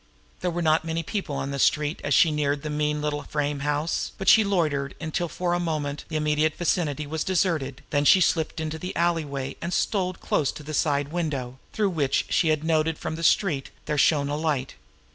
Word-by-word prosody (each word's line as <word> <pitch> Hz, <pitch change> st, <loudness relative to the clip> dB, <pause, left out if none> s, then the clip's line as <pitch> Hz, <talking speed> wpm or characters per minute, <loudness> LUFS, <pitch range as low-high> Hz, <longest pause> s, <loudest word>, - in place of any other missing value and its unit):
There 180 Hz, -, -1 dB
were 175 Hz, 0 st, -2 dB
not 155 Hz, 0 st, +3 dB
many 165 Hz, 0 st, -2 dB
people 190 Hz, -4 st, -3 dB
on 135 Hz, -, -3 dB
the 140 Hz, -, -3 dB
street 150 Hz, +3 st, +1 dB
as -, -, +2 dB
she 165 Hz, -, +5 dB
neared 145 Hz, -1 st, 0 dB
the 150 Hz, -, -3 dB
mean 150 Hz, 0 st, -1 dB
little 150 Hz, -1 st, -1 dB
frame 145 Hz, -1 st, -2 dB
house, 150 Hz, +3 st, -1 dB
but 195 Hz, -, -6 dB
she 220 Hz, -, +7 dB
loitered 155 Hz, -9 st, 0 dB
until 170 Hz, +2 st, -2 dB
for 175 Hz, +1 st, -1 dB
the 175 Hz, -, +1 dB
moment 150 Hz, -4 st, -3 dB
the 160 Hz, -, -6 dB
immediate 155 Hz, 0 st, +1 dB
vicinity 155 Hz, -4 st, 0 dB
was 155 Hz, +1 st, -3 dB
deserted; 155 Hz, -8 st, 0 dB
then 145 Hz, -2 st, +2 dB
she 190 Hz, -, +7 dB
slipped 160 Hz, -2 st, +1 dB
into 160 Hz, 0 st, -3 dB
the 180 Hz, +2 st, -5 dB
alleyway, 150 Hz, -6 st, -1 dB
and 170 Hz, -, -3 dB
stole 185 Hz, -3 st, 0 dB
close 145 Hz, -5 st, 0 dB
to 150 Hz, -, -9 dB
the 155 Hz, +1 st, -7 dB
side 145 Hz, -1 st, +1 dB
window, 140 Hz, -7 st, -3 dB
through 205 Hz, -3 st, 0 dB
which, 145 Hz, -5 st, +1 dB
she 165 Hz, -, +2 dB
had 155 Hz, -1 st, +1 dB
noted 160 Hz, 0 st, +1 dB
from -, -, -4 dB
the 160 Hz, -, -5 dB
street, 160 Hz, -5 st, +2 dB, 0.2 s
there 150 Hz, -, -1 dB
shone 145 Hz, -1 st, +3 dB
a 145 Hz, -, -2 dB
light. 150 Hz, -4 st, -1 dB
155 Hz, 210 wpm, -25 LUFS, 145-170 Hz, 0.2 s, she